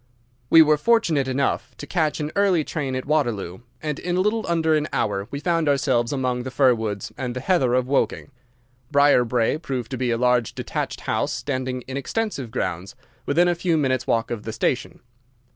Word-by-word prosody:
We 165 Hz, -, +8 dB
were 150 Hz, 0 st, +3 dB
fortunate 160 Hz, -, +2 dB
enough 130 Hz, -2 st, -1 dB
to -, -, -7 dB
catch 155 Hz, -1 st, 0 dB
an 150 Hz, 0 st, -3 dB
early 195 Hz, -5 st, +3 dB
train 140 Hz, -4 st, -3 dB
at 130 Hz, -, -3 dB
Waterloo, 120 Hz, -, -1 dB, 0.2 s
and 150 Hz, -2 st, -3 dB
in 175 Hz, 0 st, -2 dB
a -, -, +2 dB
little 210 Hz, +3 st, +1 dB
under 165 Hz, -2 st, +2 dB
an 155 Hz, 0 st, +1 dB
hour 100 Hz, -1 st, -1 dB
we 140 Hz, -, -5 dB
found 165 Hz, -1 st, +1 dB
ourselves 130 Hz, -4 st, +1 dB
among 130 Hz, -3 st, -1 dB
the 130 Hz, -, -5 dB
fir 130 Hz, -1 st, +4 dB
woods 110 Hz, -3 st, -4 dB
and 125 Hz, -2 st, -3 dB
the -, -, -2 dB
heather 130 Hz, -5 st, +2 dB
of 130 Hz, -1 st, +2 dB
Woking. 140 Hz, +1 st, 0 dB, 0.6 s
Briarbrae 125 Hz, -2 st, +3 dB
proved 125 Hz, -7 st, -4 dB
to 130 Hz, -, -4 dB
be 125 Hz, -1 st, 0 dB
a 115 Hz, -, +1 dB
large 125 Hz, -2 st, +1 dB
detached -, -, -4 dB
house -, -, -1 dB
standing 130 Hz, -2 st, -3 dB
in 130 Hz, +2 st, -6 dB
extensive 140 Hz, -, -3 dB
grounds 95 Hz, -2 st, -4 dB, 0.3 s
within 170 Hz, +5 st, +3 dB
a 175 Hz, -, +3 dB
few 170 Hz, -1 st, 0 dB
minutes' 130 Hz, -4 st, 0 dB
walk 115 Hz, 0 st, 0 dB
of 115 Hz, -3 st, -3 dB
the 110 Hz, +1 st, -6 dB
station. 125 Hz, +3 st, -2 dB
135 Hz, 195 wpm, -23 LUFS, 125-155 Hz, 0.6 s, We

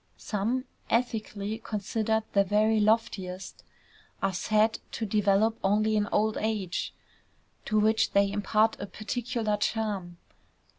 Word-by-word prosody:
Some, 230 Hz, +5 st, -2 dB, 0.2 s
ethically 220 Hz, -3 st, -1 dB
considered 220 Hz, +1 st, -1 dB
the 200 Hz, -, +5 dB
very 215 Hz, +3 st, +2 dB
loftiest, 205 Hz, -4 st, 0 dB, 0.6 s
are 195 Hz, -1 st, 0 dB
said 215 Hz, +4 st, +2 dB
to 225 Hz, -, -2 dB
develop 210 Hz, +1 st, +2 dB
only 215 Hz, +2 st, +2 dB
in 205 Hz, -1 st, +1 dB
old 215 Hz, +1 st, +2 dB
age, 210 Hz, -5 st, -2 dB, 0.7 s
to 215 Hz, 0 st, +2 dB
which 220 Hz, +1 st, +3 dB
they 200 Hz, 0 st, +4 dB
impart 210 Hz, +2 st, +2 dB
a 200 Hz, -, -5 dB
particular 215 Hz, +1 st, -2 dB
charm. 205 Hz, -5 st, -2 dB
215 Hz, 115 wpm, -28 LUFS, 200-220 Hz, 0.7 s, the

